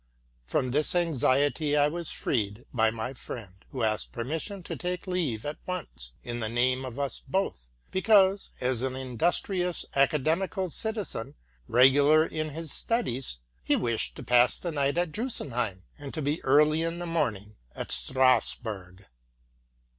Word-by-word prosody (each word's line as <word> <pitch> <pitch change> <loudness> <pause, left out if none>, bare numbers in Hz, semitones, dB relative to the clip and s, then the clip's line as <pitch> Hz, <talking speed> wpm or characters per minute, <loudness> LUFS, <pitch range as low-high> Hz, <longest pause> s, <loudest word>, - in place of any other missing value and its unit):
From 125 - 0
this 150 +6 +1
anxiety 145 -2 +2
I 145 0 +5
was 170 +2 -4
freed 110 0 -1
by 110 -3 +4
my 110 +3 -4
friend, 115 -6 -8 0.2
who 130 -3 -3
asked 110 -1 0
permission 160 - -4
to - - -5
take 180 +1 -3
leave 165 - -1
at 145 +1 -4
once, 65 - -5
in 120 0 -4
the 110 -2 -2
name 125 +3 +1
of 130 -1 -7
us 140 -1 -2
both, 185 - -2 0.2
because, 195 0 +4
as 125 -2 0
an 130 0 -1
industrious 175 - 0
academical 160 +7 +1
citizen, 215 - -3 0.3
regular 140 +5 +6
in 155 -1 -3
his 160 0 -5
studies, 135 - -1 0.3
he - - +3
wished 115 -2 -1
to - - -8
pass 125 +1 +4
the 175 - -4
night 140 0 0
at 175 -2 +1
Drusenheim, 125 - -2 0.2
and 145 0 -7
to 155 - -2
be 145 +3 -1
early 150 +3 +4
in 165 +1 -1
the 175 - -4
morning 110 - -2 0.2
at - - -5
Strasburg. 105 -7 0
140 Hz, 150 wpm, -28 LUFS, 120-165 Hz, 0.3 s, regular